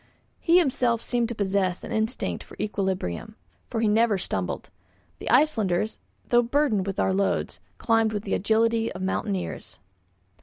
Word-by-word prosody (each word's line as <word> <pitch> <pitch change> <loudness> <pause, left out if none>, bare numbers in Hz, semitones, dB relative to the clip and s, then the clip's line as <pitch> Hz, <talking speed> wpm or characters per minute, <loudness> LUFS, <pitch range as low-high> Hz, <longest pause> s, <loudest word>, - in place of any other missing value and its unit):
He 340 +1 +4
himself 250 -8 +2
seemed 235 0 -1
to 235 - -4
possess 190 -3 0
an - - -7
instinct 220 +3 -1
for - - -15
equilibrium, 190 - -2 0.3
for 225 - -2
he 225 - +3
never 215 0 +3
stumbled. 95 - -3 0.5
The - - -5
Icelanders, 220 - +2 0.3
though 240 0 +5
burdened 240 -6 +1
with 195 - -3
our 190 - +2
loads, 195 +1 0 0.2
climbed 225 -1 +2
with 205 -1 -3
the 200 - -3
agility 225 +2 +2
of 185 - -6
mountaineers. 190 - -3
220 Hz, 150 wpm, -26 LUFS, 195-235 Hz, 0.5 s, though